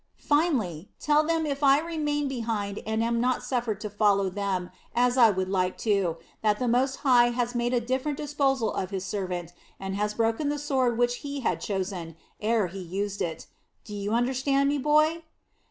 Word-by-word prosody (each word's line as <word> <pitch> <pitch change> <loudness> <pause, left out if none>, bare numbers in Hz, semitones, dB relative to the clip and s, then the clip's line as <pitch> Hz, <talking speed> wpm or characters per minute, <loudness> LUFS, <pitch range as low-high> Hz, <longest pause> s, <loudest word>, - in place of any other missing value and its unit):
Finally, 250 - 0
tell 300 0 +3
them 325 0 0
that 300 - -1
if 280 +1 -4
I 275 -1 +6
remain 300 -3 -1
behind 225 -6 -3
and 220 +1 0
am 235 0 +1
not 255 +1 +1
suffered 235 -5 -1
to 210 - -4
follow 200 -2 +2
them, 190 -2 -2 0.2
as 245 +1 +3
I 240 -3 +7
would 190 -2 -1
like 185 -1 0
to, 195 -6 +1 0.2
that 210 -1 +2
the 250 - -1
Most 260 +3 +2
High 245 -2 +6
has 240 0 -1
made 240 0 0
a 250 - +2
different 260 +4 -2
disposal 270 -5 0
of 185 - -3
His 190 -1 -4
servant 180 -4 -4 0.3
and 195 0 -4
has 210 +1 -1
broken 230 +6 +1
the 295 - -1
sword 265 -5 0
which 245 0 +2
He 285 -1 -5
had - - -1
chosen, 185 -5 -3 0.3
ere 220 -1 +2
He 185 +2 -7
used 195 +3 -4
it. 165 -2 -3 0.4
Do 210 - -10
you 205 0 -3
understand 265 +3 +2
me, 290 0 0
boy?" 305 +3 +3
235 Hz, 190 wpm, -27 LUFS, 200-275 Hz, 0.4 s, I